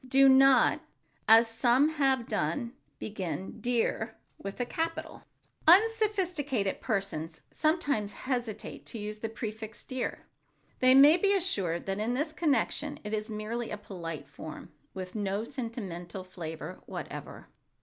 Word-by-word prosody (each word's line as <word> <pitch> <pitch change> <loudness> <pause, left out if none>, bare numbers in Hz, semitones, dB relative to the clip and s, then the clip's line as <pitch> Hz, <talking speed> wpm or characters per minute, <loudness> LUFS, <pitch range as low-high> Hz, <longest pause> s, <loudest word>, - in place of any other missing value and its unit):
Do 270 +1 +6
not—as 260 -3 +4
some 240 +5 +3
have 270 -6 +1
done—begin 195 - -4
"dear" 230 -2 0 0.2
with 195 +3 -7
a 245 - +1
capital. 330 +5 -4 0.4
Unsophisticated 360 - +3
persons 175 -7 -2
sometimes 290 - 0
hesitate 245 -5 -4
to - - -7
use 210 0 -5
the 225 - -3
prefix 220 -1 -6
"dear,"—they 255 0 -1
may 290 +5 +8
be 400 +2 +3
assured 195 - -1
that 195 +1 -2
in 230 +3 0
this 305 +4 -1
connection 295 -1 0
it 210 0 -5
is 215 0 -2
merely 220 +2 -3
a 210 - -4
polite 170 -6 -7
form, 155 +1 -9 0.2
with 185 -1 -6
no 205 0 -1
sentimental 205 -8 -6
flavor 170 -1 -7
whatever. - - -7
225 Hz, 120 wpm, -30 LUFS, 195-275 Hz, 0.4 s, may